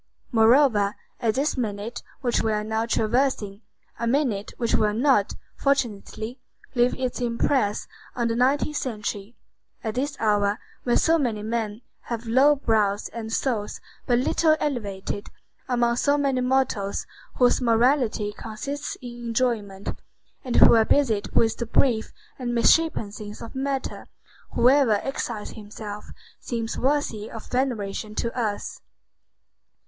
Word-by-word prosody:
Moreover, 225 -3 +4 0.2
at 225 -3 +1
this 285 +3 +1
minute 225 -1 -3 0.2
which 245 -3 +1
we 220 - 0
are 210 0 -1
now 220 +1 -1
traversing,—a 230 -2 -1
minute 235 -6 0
which 235 -2 -1
will 210 -1 +2
not, 245 -4 +3 0.2
fortunately, 240 -2 -1 0.3
leave 245 -1 +3
its 255 -1 -2
impress 230 -2 +1 0.3
on 240 -1 0
the 230 - 0
nineteenth 280 +4 +2
century,—at 215 0 -6
this 280 +4 -2
hour, 205 -1 +2 0.3
when 240 - +3
so 330 0 +3
many 225 -7 -1
men 220 0 -3 0.3
have 235 -1 -3
low 265 +6 +5
brows 215 -6 +1
and 220 -1 -6
souls 225 -4 -1 0.3
but 240 - +3
little 310 +5 +3
elevated, 205 -7 -3 0.4
among 240 -1 +2
so 285 +3 +3
many 275 -3 +1
mortals 250 -6 0 0.3
whose 250 +1 +3
morality 235 -3 +2
consists 275 +7 -5
in 240 -1 -8
enjoyment, 220 -5 -1 0.5
and 250 - -3
who - - +8
are 225 -1 +6
busied 225 -4 +2
with 225 -1 +3
the 235 - -3
brief 230 -1 +2 0.3
and 240 -2 -2
misshapen 235 -3 +3
things 210 0 -8
of 230 - -9
matter, 270 0 -3 0.5
whoever 255 -1 +5
exiles 235 -5 -4
himself 210 -1 -8 0.3
seems 230 -2 -3
worthy 260 -6 0
of 225 - -8
veneration 220 -5 -2
to 235 - -2
us. 215 -5 -3
235 Hz, 130 wpm, -25 LUFS, 215-260 Hz, 0.5 s, who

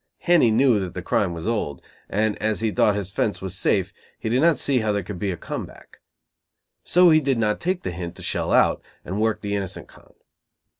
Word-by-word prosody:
Henny 170 -9 +4
knew 115 0 +4
that 95 -3 -5
the 90 - -5
crime 100 -5 +1
was 85 +3 -6
old, 105 - -2 0.3
and, 105 +1 0
as 110 0 0
he 110 -1 0
thought 105 0 +2
his 100 -2 -4
"fence" 100 -2 -1
was 95 0 -5
safe, 95 -1 0 0.2
he 110 - -4
did 125 +4 +2
not 165 -1 +4
see 135 -3 +1
how 110 -2 0
there 100 -1 -1
could 95 0 -7
be 100 - -1
a 90 - -3
come - - -5
back. - - -17 0.8
So 180 -1 +5
he 155 0 +5
did 135 -3 0
not 105 -2 0
take 180 +1 -2
the 90 - -3
hint 85 0 -6
to - - -10
shell - - -2
out, - - +3 0.2
and 100 +4 -3
worked 110 -1 0
the 100 0 -2
innocent 100 -3 -5
con. - - -20
105 Hz, 230 wpm, -23 LUFS, 95-115 Hz, 0.8 s, So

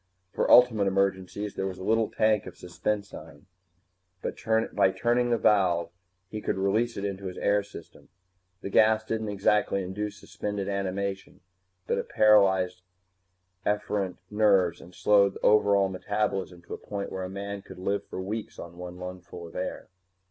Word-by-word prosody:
For - - 0
ultimate 115 -5 +6
emergencies 95 +1 -1
there 95 - -2
was 95 -1 -6
the 95 - -8
little 110 +2 +2
tank 110 -1 +1
of - - -9
suspensine. 90 -4 -5 0.8
By - - -1 0.6
turning 120 +5 +1
a 120 - +3
valve, 90 -6 +2 0.4
he 110 +2 -6
could - - -2
release 110 +5 0
it 100 - -3
into 100 -1 -4
his 90 - -7
air 100 0 +2
system. 100 -5 -13 0.5
The 100 - -6
gas 110 +1 +4
didn't 110 -1 -3
exactly 100 0 +1
induce 105 +3 -5
suspended 105 -2 -4
animation, 100 0 -3 0.4
but - - 0
it - - -5
paralyzed 95 -4 +4 0.8
efferent 100 -3 -1
nerves 100 -5 +3
and 90 - -14
slowed 100 -2 +4
the - - -9
overall 100 -2 +4
metabolism 95 -2 -2
to - - -9
a - - -6
point 100 -1 -5
where 95 - -4
a 90 - -5
man 100 +1 -5
could - - -12
live 100 +2 -1
for - - -6
weeks 105 +4 -5
on 85 0 -9
one 90 0 -7
lungful 90 -1 -8
of 80 - -15
air. 90 - -4
100 Hz, 160 wpm, -27 LUFS, 95-105 Hz, 0.8 s, ultimate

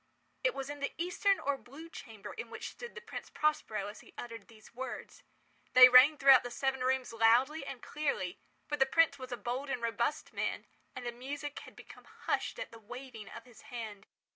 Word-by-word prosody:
It - - +2
was 270 0 -4
in 290 0 -6
the 280 - -2
eastern 365 +3 +2
or 280 -1 -1
blue 285 +7 -11
chamber 220 -10 -9
in 460 - -7
which - - -6
stood 480 -1 -9
the 470 - -7
Prince 470 - -8
Prospero 225 -9 0
as 205 +2 -8
he - - -17
uttered 230 -1 -8
these 220 -1 -17
words. 260 +2 -7 0.5
They 255 0 +11
rang 255 +5 +8
throughout 270 -2 +8
the 245 - -6
seven 265 +2 -1
rooms 255 -1 0
loudly 245 +7 +4
and 255 -3 -7
clearly, 280 -12 -2 0.3
for 295 - -2
the 270 -2 +4
prince 295 -1 +3
was 255 -1 -8
a 245 - -3
bold 255 +5 -3
and 260 - -1
robust 235 +5 -1
man, - - -2 0.3
and 255 - -6
the 240 - -2
music 285 +4 -6
had - - -13
become - - -13 0.2
hushed - - 0
at - - -6
the 230 - -12
waving 240 -1 -9
of 230 - -10
his 245 -3 -16
hand. 220 -4 -7
255 Hz, 205 wpm, -33 LUFS, 235-290 Hz, 0.5 s, They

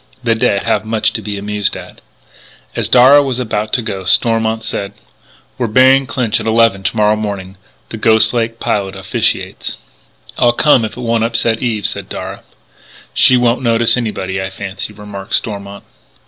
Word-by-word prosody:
The 115 -2 +2
dead 100 -3 0
have - - 0
much 110 0 0
to 115 - -4
be 105 0 -5
amused 105 0 -2
at. - - -12 0.7
As - - -1
Darragh 130 +4 +7
was 130 -3 -2
about 110 -3 -2
to 120 - +2
go, 100 -4 -5
Stormont 110 +3 +1
said: 100 -3 -4 0.7
"We're 120 - 0
burying 130 +4 +4
Clinch 115 -5 -1
at 110 - -5
eleven 110 -3 +3
to 105 - -2
morrow 105 0 +3
morning. 100 -3 -5 0.3
The 115 - -6
Ghost 110 +1 +4
Lake 115 -1 -2
Pilot 100 -2 -2
officiates." 95 0 -2 0.6
"I'll 120 0 +4
come 130 -3 +4
if 110 - -8
it - - -6
won't 115 -1 0
upset 115 0 0
Eve," 115 -4 -2
said - - -4
Darragh. - - -6 0.7
"She 130 - +5
won't 120 +1 +1
notice 115 -1 +3
anybody, 100 -5 -3
I 95 - -4
fancy," 95 +2 -6
remarked 105 -1 -5
Stormont. 100 -1 -4
110 Hz, 170 wpm, -15 LUFS, 100-120 Hz, 0.7 s, Darragh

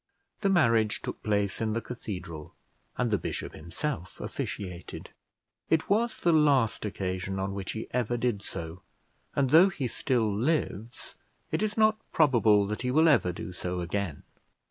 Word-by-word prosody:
The 195 - +1
marriage 115 - +3
took - - -5
place 100 0 0
in 110 -1 0
the 115 - 0
cathedral, 90 -10 -7 0.4
and 120 -2 0
the 105 - +2
bishop - - -4
himself 90 - -5
officiated. 90 -3 -6 0.6
It 160 +3 +1
was 230 +3 +2
the 170 - +3
last 140 -9 +3
occasion 95 -1 -3
on 95 +1 -2
which 95 -1 -4
he 110 - -4
ever 120 -1 0
did 120 -4 0
so; 85 -2 -7 0.5
and, 135 -2 +2
though 170 +5 +8
he 140 -8 -3
still 115 -3 0
lives, 120 - -2 0.4
it - - 0
is 215 0 -1
not 215 0 +4
probable 115 -9 +4
that 105 +1 -3
he 125 - -1
will 155 +5 +5
ever 125 - +4
do 90 +1 -7
so 90 0 -3
again. 90 -3 -3
110 Hz, 160 wpm, -28 LUFS, 95-145 Hz, 0.6 s, though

